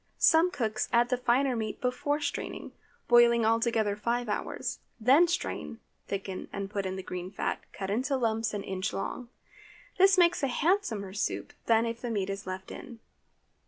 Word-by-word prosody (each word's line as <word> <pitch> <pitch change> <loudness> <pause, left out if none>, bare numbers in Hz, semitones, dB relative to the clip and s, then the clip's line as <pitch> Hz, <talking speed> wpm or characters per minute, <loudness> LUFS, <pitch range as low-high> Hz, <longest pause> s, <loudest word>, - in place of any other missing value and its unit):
Some 325 +2 +5
cooks 220 -10 -2
add 240 +1 +3
the 255 - +2
finer 250 +2 +2
meat 220 -2 -3
before 275 +4 -1
straining, 285 -1 -4 0.4
boiling 235 -1 +6
all 225 +1 +3
together 225 -3 +1
five 235 +2 -1
hours; - - -3 0.2
then 270 +10 +6
strain, 330 -8 -3 0.3
thicken, 195 -1 -4
and 200 0 -5
put 200 -2 -2
in 185 - -3
the 190 - -6
green 180 0 -5
fat, 195 - -2
cut 195 -1 -5
into 260 +6 0
lumps 225 -2 0
an 200 - -3
inch 190 +2 -3
long. 235 +5 -4 0.7
This 385 0 +6
makes 345 -2 +4
a 275 - +2
handsomer 245 - 0
soup 205 - -3
than 230 0 +4
if 230 0 -4
the 245 - -3
meat 200 -3 -1
is 195 -1 -6
left 185 0 -6
in. 240 -2 -9
230 Hz, 175 wpm, -29 LUFS, 200-255 Hz, 0.7 s, boiling